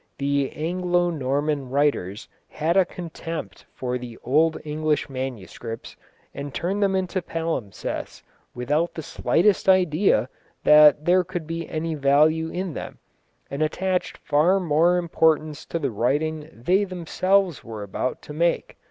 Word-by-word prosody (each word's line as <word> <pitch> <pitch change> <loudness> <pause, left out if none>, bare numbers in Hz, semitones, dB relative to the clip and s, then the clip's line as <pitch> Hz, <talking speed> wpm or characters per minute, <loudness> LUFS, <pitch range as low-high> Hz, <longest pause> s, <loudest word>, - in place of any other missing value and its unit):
The 140 -1 0
Anglo 175 +2 0
Norman 140 -1 -1
writers 130 -8 0 0.2
had 160 +3 -1
a 190 -1 +5
contempt 165 - -7
for 125 -1 -3
the 120 -2 -9
old 155 +6 +3
English 150 -1 -1
manuscripts, 120 -3 -6 0.4
and 140 0 -6
turned 180 - -2
them 195 -1 +2
into 185 0 -1
palimpsests 160 - -4 0.3
without 150 +7 0
the 160 - -5
slightest 195 +6 +2
idea 185 0 +3 0.4
that 150 0 +7
there 180 +1 +4
could 175 -2 -5
be 165 +1 -5
any 160 +1 -2
value 155 +3 +3
in 180 -1 -4
them, - - -7 0.5
and 140 +2 -3
attached 180 +4 -1
far 165 +7 +2
more 170 +1 +3
importance 160 -3 +1
to - - -2
the 140 -6 -2
writing 150 +7 -1
they 180 - +1
themselves 185 -1 0
were 110 -3 -7
about 100 +6 -3
to 150 - -9
make. 170 +3 0
155 Hz, 135 wpm, -24 LUFS, 140-175 Hz, 0.5 s, that